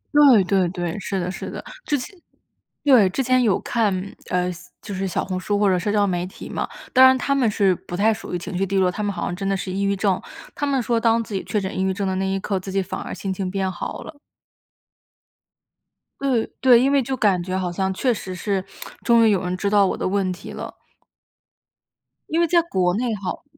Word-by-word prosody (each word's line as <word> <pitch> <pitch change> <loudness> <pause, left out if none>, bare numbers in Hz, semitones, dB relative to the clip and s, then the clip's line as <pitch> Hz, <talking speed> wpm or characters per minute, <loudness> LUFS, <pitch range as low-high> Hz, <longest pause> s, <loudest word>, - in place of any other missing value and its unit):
对， 275 -9 +7
对， 185 -1 +1
对， 175 +1 -4
是 195 0 -3
的， 180 0 -2
是 - - -6
的， - - -7 0.2
之 290 - +2
前 385 +10 -8 0.7
对， 250 -10 +6
之 265 +8 -1
前 255 0 +3
有 210 -5 +2
看， 200 -5 -1
呃， 180 0 +1 0.3
就 205 - -7
是 190 0 -2
小 180 - -2
红 185 -1 -3
书 205 +2 -1
或 205 - +3
者 185 -1 +2
社 205 +3 -1
交 205 -1 +3
媒 180 -2 -1
体 190 - -10
嘛， - - -3 0.3
当 260 - +7
然 260 0 +6
他 275 +2 0
们 260 -5 +2
是 195 -3 +3
不 175 0 -7
太 220 +2 +3
属 220 - -8
于 - - +1
情 180 +2 -7
绪 190 - 0
低 195 +1 -1
落， 185 -1 +3
他 195 - -5
们 205 - 0
好 - - -4
像 175 - -2
真 195 +1 -3
的 195 - +1
是 190 0 -5
抑 195 - -2
郁 200 0 +1
症， 195 -2 0 0.3
他 290 - -2
们 275 -1 +1
说 235 -1 +1
当 230 0 +2
自 215 - -10
己 190 - -2
确 210 - -1
诊 190 +1 -4
抑 - - 0
郁 190 - +1
症 200 0 -2
的 190 - 0
那 190 0 0
一 195 0 -1
刻， 195 0 -2
自 190 +1 -7
己 195 - 0
反 190 +1 -5
而 - - -7
心 195 -1 -3
情 185 -1 -3
变 190 -1 -1
好 175 - -6
了。 315 - -10 2.1
对， 260 -5 +1
对， 245 -2 +7
因 270 +2 +3
为 280 -1 +4
就 265 +2 -2
感 195 -6 +2
觉 185 +1 -3
好 180 -2 -2
像 190 +2 -1
确 245 +6 +1
实 190 -4 -6
是 195 +1 -1 0.4
终 235 -1 +5
于 - - +5
有 195 -3 +1
人 180 0 -2
知 200 +2 -1
道 200 -1 +5
我 - - -2
的 - - -1
问 190 -1 0
题 180 +1 -8
了。 - - -7 1.5
因 325 - +1
为 340 - +3
在 340 +1 +4
国 185 - 0
内 235 +1 -1
好 195 -2 -5
195 Hz, 260 characters per minute, -22 LUFS, 185-230 Hz, 2.1 s, 对